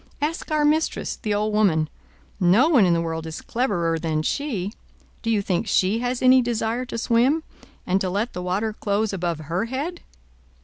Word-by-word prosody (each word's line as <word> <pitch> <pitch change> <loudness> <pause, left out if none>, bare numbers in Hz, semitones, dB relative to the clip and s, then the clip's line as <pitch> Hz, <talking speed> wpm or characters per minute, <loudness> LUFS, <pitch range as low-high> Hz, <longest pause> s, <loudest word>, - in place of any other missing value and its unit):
Ask 315 +4 -2
our 305 -1 +2
mistress, 310 +2 +1
the 210 -4 -2
old 210 +1 0
woman; 175 -8 +3 0.5
no 195 - +5
one 245 - +5
in 175 - +3
the 165 - +1
world 165 -1 -3
is 160 - -6
cleverer 175 -10 -1
than 155 -1 -1
she. 215 - -2 0.5
Do 230 - -3
you 215 -3 +2
think 195 +3 -1
she 200 +2 +2
has 245 +1 -2
any 255 0 +7
desire 235 +1 -1
to 235 - -5
swim, 245 +7 +2 0.4
and 190 +2 +1
to 185 - 0
let 205 +6 -2
the 180 - -4
water 195 +5 -1
close 210 0 -1
above 170 -4 -2
her 170 +7 -2
head?" 285 +9 -4
215 Hz, 185 wpm, -23 LUFS, 180-250 Hz, 0.5 s, any